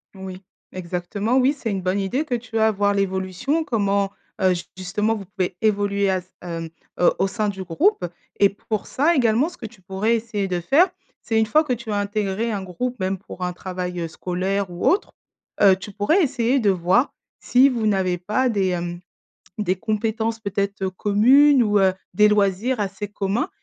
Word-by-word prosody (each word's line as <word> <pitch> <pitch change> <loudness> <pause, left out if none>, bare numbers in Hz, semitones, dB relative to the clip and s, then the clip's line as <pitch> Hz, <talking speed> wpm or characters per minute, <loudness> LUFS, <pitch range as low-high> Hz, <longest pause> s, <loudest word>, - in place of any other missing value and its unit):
Oui. 190 -1 -8 0.3
Exactement, 185 +6 -2
oui 265 +3 +4
c'est 240 -6 -4
une 195 -2 -2
bonne 185 +2 0
idée 250 +11 -1
que 255 -5 -1
tu 230 -1 -4
as, 220 0 +4
voir 205 0 +1
l'évolution, 190 - -1
comment 200 -6 0 0.3
heu 185 -1 +4
j 175 - -5
justement 210 +4 -1
vous 205 - -6
pouvez 185 -2 -3
évoluer 200 -2 +1
à, 190 -1 +1 0.2
hem, 165 -2 -5 0.3
heu, 175 - +5
au 195 - +3
sein 215 +1 -1
du 195 -2 -4
groupe 185 - +1 0.4
et 200 - +7
pour 210 +1 -4
ça 315 +6 +2
également, 240 +2 +3
ce 350 - -9
que - - -8
tu 215 -3 -12
pourrais 195 +5 0
essayer 215 -4 -2
de 180 - -1
faire, 285 - +4 0.3
c'est 225 -1 0
une 220 - +3
fois 305 +8 +3
que 300 - -4
tu 235 -2 -3
as 210 - 0
intégré 205 +2 -1
un 200 -3 -3
groupe, 235 +6 -4
même 190 +1 -1
pour 185 -1 -9
un 180 - -2
travail, 180 -1 -5
heu, 165 - -2
scolaire 185 +4 -2
ou 175 0 -5
autre, 390 +4 +2 0.5
heu, 195 -2 +7
tu 195 +2 -9
pourrais 205 - +2
essayer 265 -3 +1
de 215 -5 +2
voir 185 +7 +2 0.3
si 260 +3 +4
vous 230 -4 -1
n'avez 185 -3 +1
pas 215 +8 0
des, 200 -4 +1
hem, 175 -1 -3 0.6
des 190 -3 0
compétences 220 +2 -1
peut-être, 200 -1 -3
heu, 190 - 0
communes 245 +8 +5
ou, 210 -2 +2
heu, 190 -1 +3 0.2
des 210 +3 +5
loisirs 210 +4 +1
assez 200 0 -3
communs 205 - -1
205 Hz, 195 wpm, -22 LUFS, 190-230 Hz, 0.6 s, et